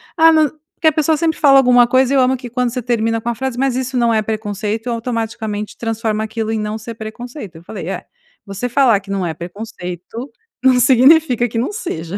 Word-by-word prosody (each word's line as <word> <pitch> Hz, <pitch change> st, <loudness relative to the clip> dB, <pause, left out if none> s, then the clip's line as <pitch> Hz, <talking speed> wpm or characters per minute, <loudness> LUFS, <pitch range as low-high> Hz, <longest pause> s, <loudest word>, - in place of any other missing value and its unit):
"Ah, 325 Hz, 0 st, +6 dB
não", 315 Hz, -1 st, +4 dB, 0.3 s
porque 320 Hz, -, +1 dB
a -, -, -1 dB
pessoa 310 Hz, +1 st, +1 dB
sempre 320 Hz, 0 st, 0 dB
fala 275 Hz, -2 st, +6 dB
alguma 245 Hz, -2 st, +5 dB
coisa, 260 Hz, +1 st, +3 dB
eu 275 Hz, -, +4 dB
amo 260 Hz, 0 st, +3 dB
que 245 Hz, -1 st, -9 dB
quando 250 Hz, 0 st, 0 dB
você 250 Hz, +1 st, -4 dB
termina 225 Hz, -1 st, 0 dB
com 235 Hz, -, -3 dB
a 235 Hz, -, -2 dB
frase: 265 Hz, -1 st, -4 dB
"Mas 265 Hz, -1 st, 0 dB
isso 260 Hz, 0 st, -2 dB
não 235 Hz, -1 st, +2 dB
é 220 Hz, -, +2 dB
preconceito.", 215 Hz, +1 st, -3 dB
automaticamente 225 Hz, -3 st, -4 dB
transforma 225 Hz, -1 st, -2 dB
aquilo 220 Hz, 0 st, -3 dB
em 220 Hz, -, -1 dB
"não 210 Hz, +1 st, -3 dB
ser 225 Hz, +1 st, -8 dB
preconceito", 225 Hz, -, -8 dB
eu 165 Hz, -, -14 dB
falei: 210 Hz, -, -7 dB
"É, -, -, -5 dB, 0.4 s
você 200 Hz, +4 st, -4 dB
falar 245 Hz, -5 st, +4 dB
que 195 Hz, -, -17 dB
não 195 Hz, -2 st, -1 dB
é 165 Hz, -, -2 dB
preconceito, 180 Hz, -, -8 dB, 0.3 s
não 260 Hz, -1 st, +5 dB
significa 255 Hz, 0 st, +5 dB
que 230 Hz, -, -5 dB
não 240 Hz, -, -1 dB
seja", 195 Hz, -, -5 dB
235 Hz, 215 wpm, -17 LUFS, 215-260 Hz, 0.4 s, Ah